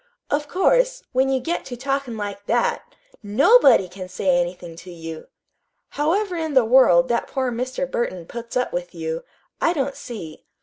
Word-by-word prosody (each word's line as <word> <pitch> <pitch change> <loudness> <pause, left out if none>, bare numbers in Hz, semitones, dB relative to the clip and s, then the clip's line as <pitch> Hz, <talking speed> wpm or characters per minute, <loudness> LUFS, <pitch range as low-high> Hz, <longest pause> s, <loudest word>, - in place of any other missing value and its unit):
"Of 295 +1 0
course, - - +2
when 265 +1 +2
you 265 -1 +1
get 330 +7 -3
to 245 - -7
talkin' 270 -2 -2
like 205 -1 -6
that, 240 +1 0 0.3
NOBODY 230 - +5
can 185 +1 -9
say 185 +1 -2
anything 175 -1 -6
to 175 +2 -11
you! 165 -2 -8 0.6
However 360 +6 0
in 320 -3 -3
the 260 -3 +5
world 255 +1 +5
that 235 - 0
poor 260 -2 -2
Mr. 255 +3 -2
Burton 210 -9 -3
puts 235 +5 -6
up 250 - -1
with 175 0 -4
you, 160 0 -4 0.4
I 335 - +3
don't 275 -3 -2
see. 170 -10 -9
245 Hz, 170 wpm, -22 LUFS, 185-275 Hz, 0.6 s, NOBODY